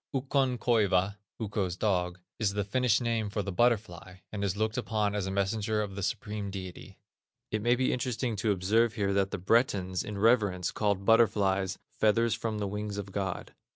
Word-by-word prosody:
Ukkon 135 -1 +1
koiva 100 -4 +2 0.2
(Ukko's 100 -5 -2
dog) 90 -4 0 0.2
is 105 -3 +1
the 105 0 0
Finnish 125 +2 +2
name 115 -3 0
for 105 0 -2
the 100 - -4
butterfly, 95 -4 0 0.2
and 100 -1 -4
is 100 0 -1
looked 110 +1 0
upon 105 0 0
as 100 -2 -2
a - - -2
messenger 105 +2 0
of 100 -2 -6
the 100 - -5
Supreme 105 0 -3
Deity. 95 -2 -8 0.5
It 110 - -1
may 120 +3 +3
be 130 +1 +1
interesting 125 -1 -2
to 105 +1 +1
observe 105 +5 +2
here 100 -3 0
that 100 -1 +2
the - - -3
Bretons 95 -3 +1
in 105 -1 -6
reverence 100 -5 +2
called 100 -2 0
butterflies, 100 -4 +3 0.2
"feathers 115 +2 +3
from 110 -2 -3
the 105 - -2
wings 105 +1 -4
of 100 -1 -5
God." 95 -2 -4
105 Hz, 185 wpm, -29 LUFS, 95-115 Hz, 0.5 s, may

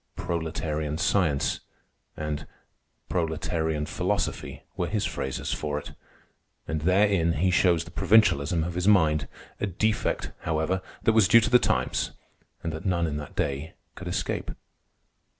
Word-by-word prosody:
"Proletarian 80 -3 -2
science" 80 -5 +1 0.6
and 75 -1 -4 0.6
"proletarian 80 -2 -1
philosophy" 75 - -2
were - - -1
his - - -1
phrases 65 - -3
for 75 -1 -2
it, 75 - -6 0.8
and 80 -1 -2
therein 90 -1 +3
he 90 +4 +2
shows 90 -2 +3
the 85 - -12
provincialism 85 -6 +3
of 85 +2 -3
his 90 +2 -1
mind—a 80 0 +1
defect, 105 +4 0
however, 80 +4 -1 0.2
that 110 - +4
was 110 -4 +5
due 115 +2 +8
to 120 - -1
the 125 - +7
times - - 0 0.5
and 80 - -2
that 80 - -6
none 85 -3 +1
in 75 -2 -2
that 75 -1 -8
day 70 +3 -2 0.2
could - - -8
escape. - - -2
80 Hz, 135 wpm, -27 LUFS, 75-95 Hz, 0.8 s, due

